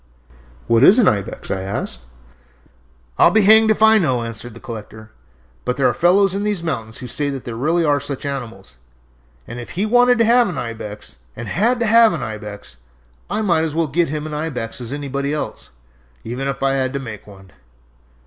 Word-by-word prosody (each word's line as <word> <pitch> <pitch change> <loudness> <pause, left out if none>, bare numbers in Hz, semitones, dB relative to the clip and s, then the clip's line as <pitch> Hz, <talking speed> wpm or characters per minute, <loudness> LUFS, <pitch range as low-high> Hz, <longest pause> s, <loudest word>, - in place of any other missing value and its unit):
"What 115 +1 +3
is 195 - +8
an 235 -6 +4
ibex?" 100 -4 -2
I 95 - -2
asked. 95 -10 -5 1.1
"I'll - - +7
be 220 -1 +3
hanged 220 +2 +7
if 215 0 +2
I 220 0 +6
know," 130 - 0
answered 115 0 -8
the - - -11
collector. 110 -1 -10 0.5
"But 125 - -2
there 135 - +1
are - - +1
fellows 180 +3 +3
in 200 +1 -2
these 205 -5 -2
mountains 110 -9 -4
who - - -8
say 145 +4 -2
that 135 -2 -5
there 120 - -6
really 160 +7 +1
are 145 -1 +2
such 140 0 -5
animals, 115 - -6 0.7
and 120 +1 -8
if 120 +7 -9
he 200 - +1
wanted 245 +2 +4
to 230 - +3
have 240 0 +4
an - - -5
ibex, 105 - -7 0.2
and 120 - -7
had 235 - +1
to - - +2
have 230 0 +5
an - - -4
ibex, 105 - -8 0.5
I 215 - -1
might 170 -5 +2
as 160 -2 -3
well 165 0 +1
get 160 +3 0
him 150 +1 -4
an 155 - -6
ibex 135 -7 -4
as 120 0 -6
anybody 140 0 -3
else, 150 - -6 0.5
even 125 +4 -4
if 135 0 -4
I 135 0 +2
had 130 -1 -1
to 140 - -2
make 115 -7 -9
one. 95 -2 -15
140 Hz, 205 wpm, -19 LUFS, 115-180 Hz, 1.1 s, is